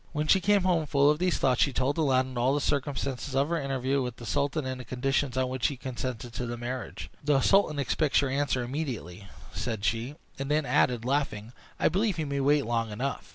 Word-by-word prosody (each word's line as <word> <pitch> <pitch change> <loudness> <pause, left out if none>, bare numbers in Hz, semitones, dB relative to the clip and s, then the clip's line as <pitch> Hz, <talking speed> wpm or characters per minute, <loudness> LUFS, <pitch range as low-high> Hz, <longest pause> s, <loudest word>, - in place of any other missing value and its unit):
When 150 -1 -1
she 190 +5 +4
came 205 0 +3
home, 170 -4 +1
full 140 0 +4
of 150 - -1
these 180 -1 +1
thoughts, 130 -2 +2
she 140 - +4
told 130 +3 0
Aladdin 130 -3 +2
all 125 +3 +2
the - - +1
circumstances 140 -2 -2
of 140 +3 +2
her 170 -2 0
interview 135 0 0
with 125 -2 -3
the 120 - -10
sultan, 140 - -1
and 130 0 -4
the - - -8
conditions 130 +2 -1
on 130 0 +2
which 130 -1 0
he 140 - -4
consented 125 -2 -5
to 120 +2 -4
the 120 0 -4
marriage. 125 +2 -6
"The 145 -1 +3
sultan 195 -5 +3
expects 140 +1 +1
your 140 -2 -1
answer 135 -2 0
immediately," 120 - -5 0.3
said 110 -4 -3
she; 115 +6 -1 0.2
and 135 0 -3
then 150 0 +2
added, 120 -3 +2
laughing, 125 -5 -1 0.3
"I - - +4
believe 200 0 +1
he 160 - -1
may 140 -1 -2
wait 145 +1 +3
long 115 -1 -1
enough!" 125 +7 -4
135 Hz, 220 wpm, -28 LUFS, 125-145 Hz, 0.3 s, she